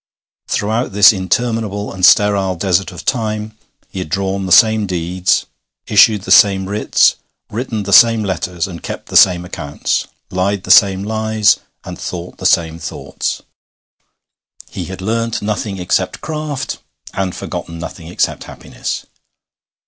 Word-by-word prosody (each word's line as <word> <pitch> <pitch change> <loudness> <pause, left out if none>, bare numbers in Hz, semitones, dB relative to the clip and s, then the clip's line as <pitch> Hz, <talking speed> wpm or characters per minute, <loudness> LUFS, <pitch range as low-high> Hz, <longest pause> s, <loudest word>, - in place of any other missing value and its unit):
Throughout 110 +2 -1
this 105 +3 +7
interminable 105 +1 -2
and 95 -1 -8
sterile 100 -1 +4
desert 95 +1 0
of 90 -1 -10
time 110 -3 -2 0.4
he 95 - -6
had 90 - -5
drawn 95 +2 -2
the - - -5
same 110 +1 +5
deeds, 90 +1 0 0.4
issued 105 -1 +4
the - - -5
same 95 -2 +5
writs, 105 +2 +2 0.3
written 110 -1 -3
the 100 0 -2
same 115 +1 +6
letters, 90 -2 -3
kept - - -7
the - - -7
same 90 -1 +5
accounts, 75 -5 -3 0.2
lied 95 +1 -1
the - - -1
same 95 -1 +5
lies, 110 0 +1 0.2
and - - -9
thought 90 0 -7
the - - +1
same 80 0 +1
thoughts. - - -5 1.3
He - - -5
had 95 0 -8
learnt 115 +3 -1
nothing 105 -1 -3
except 90 0 -1
craft, 155 -3 -5 0.3
and 95 -2 -2
forgotten 85 - -6
nothing 85 0 -8
except 90 - -2
happiness. - - -6
100 Hz, 140 wpm, -16 LUFS, 90-110 Hz, 1.3 s, this